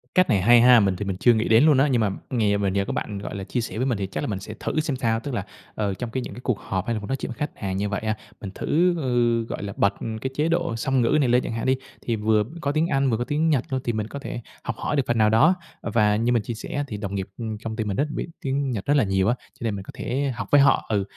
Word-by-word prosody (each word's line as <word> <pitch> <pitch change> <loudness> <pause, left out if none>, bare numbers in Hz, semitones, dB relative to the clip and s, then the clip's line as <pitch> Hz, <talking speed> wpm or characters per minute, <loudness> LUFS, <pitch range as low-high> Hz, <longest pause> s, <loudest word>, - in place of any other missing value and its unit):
Cách 185 -2 +4
này 100 -6 +3
hay 120 +4 +6
ha. 125 -1 +8
Mình 95 -3 +2
thì 100 - -4
mình 95 -2 -3
chưa 120 +3 +5
nghĩ 110 0 0
đến 115 +4 +6
luôn 150 -3 +5
á, 135 +3 +4
nhưng 125 -4 +2
mà 105 - +2 0.2
nghè 105 -5 +2
mà 100 -1 0
nhờ 100 +1 0
có - - -3
bạn, 100 -2 -3
gọi 100 - -6
là, 100 - -4
chia 120 +5 -2
sẻ 110 - -5
với 130 - 0
mình 120 -6 0
thì 95 -1 -2
chắc 95 - -4
là 145 - -2
mình 100 -5 -2
sẽ 105 +3 -8
thử - - -1
xem 155 -3 -1
sao. 115 -3 +1
Tức 140 +1 -6
là, 100 -4 -2 0.3
ờ, 100 -2 -1
trong 120 +4 -5
cái 130 0 -2
những - - -7
cái 125 - -9
cuộc 115 -7 0
họp 95 0 -3
hay 115 - +1
là - - -2
muốn 105 - -8
nói 135 - -1
chuyện - - -5
khách 150 +2 -3
hàng 95 -2 -3
như 100 +1 -1
vậy 100 - -2
á, 110 0 -1 0.3
mình 100 - -5
thử, 175 +3 +2
ừ, 120 -4 +1
gọi - - -4
là, 100 0 -5
bật 100 0 +3 0.3
cái 130 - -2
chế 150 +2 +1
độ 170 -8 0
song 130 +3 +1
ngữ 120 +5 +3
này 130 - +2
lên 125 +1 +3
chẳng - - -4
hạn 115 - -3
đi, 130 - +3 0.3
thì 115 - -1
vừa 105 0 +2 0.2
có 140 - 0
tiếng 155 +3 +1
Anh 135 -3 +1
vừa 110 - +1
có 120 - -1
tiếng 155 +4 0
Nhật 135 -5 +2
luôn, 130 -1 -1
thì 120 - -1
mình 110 0 -2
có 140 - -7
thể 120 - -6 0.2
học 115 - -3
hỏi 150 - -2
được 140 - +2
phần 120 - +1
nào 110 -1 +4
đó. 150 +12 +5 0.3
Và 105 -3 +2
như 115 +3 +1
mình 120 - +3
chia 120 - -4
sẻ 115 - -8
á, 145 - 0
thì 105 - -5
đồng 100 -1 -4
nghiệp, 95 -1 -3
ừm, 110 -3 -4
công 110 -1 -4
ty 110 - -1
mình 100 -2 -3
rất 150 - +1
biết - - -3
tiếng 135 0 -1
Nhật 105 -5 -3
rất 145 - +3
là 135 - +4
nhiều 95 -1 +1
á, 120 - +3 0.2
cho - - -8
nên 110 -3 -1
mình 95 - -6
có - - -10
thể 135 +3 -2
học 115 -4 -5
với 145 -1 +7
họ. 140 - +4
Ừ, 105 -2 +1
115 Hz, 335 wpm, -24 LUFS, 105-135 Hz, 0.3 s, ha